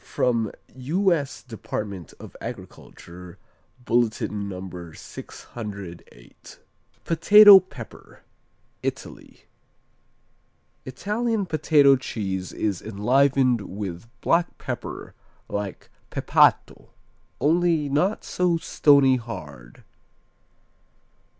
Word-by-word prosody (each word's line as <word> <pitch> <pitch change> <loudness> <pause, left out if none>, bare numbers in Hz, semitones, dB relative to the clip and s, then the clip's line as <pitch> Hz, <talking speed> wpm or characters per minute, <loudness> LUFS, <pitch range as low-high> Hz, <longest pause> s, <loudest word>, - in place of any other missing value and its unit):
From 115 -4 -1 0.2
U.S. 155 +2 -1
Department 105 - -6
of - - -12
Agriculture 90 0 -10 0.5
Bulletin 110 -4 -1
No. 90 -3 -8
608. 95 - -11 0.5
Potato 200 +4 +8
Pepper 140 - -13 0.6
Italy - - -7 1.4
Italian 210 - -2
Potato 150 -4 +4
cheese 95 -7 -4
is 100 -5 -2
enlivened 125 +3 +2
with 95 0 -7
black 170 +1 +1
pepper, - - -7 0.3
like 100 -2 -6 0.2
Pepato, - - +2 0.5
only 165 0 +2
not 175 +9 0
so 180 -2 0
stony 140 -5 +4
hard. 75 - -10
120 Hz, 75 wpm, -24 LUFS, 100-160 Hz, 1.4 s, Potato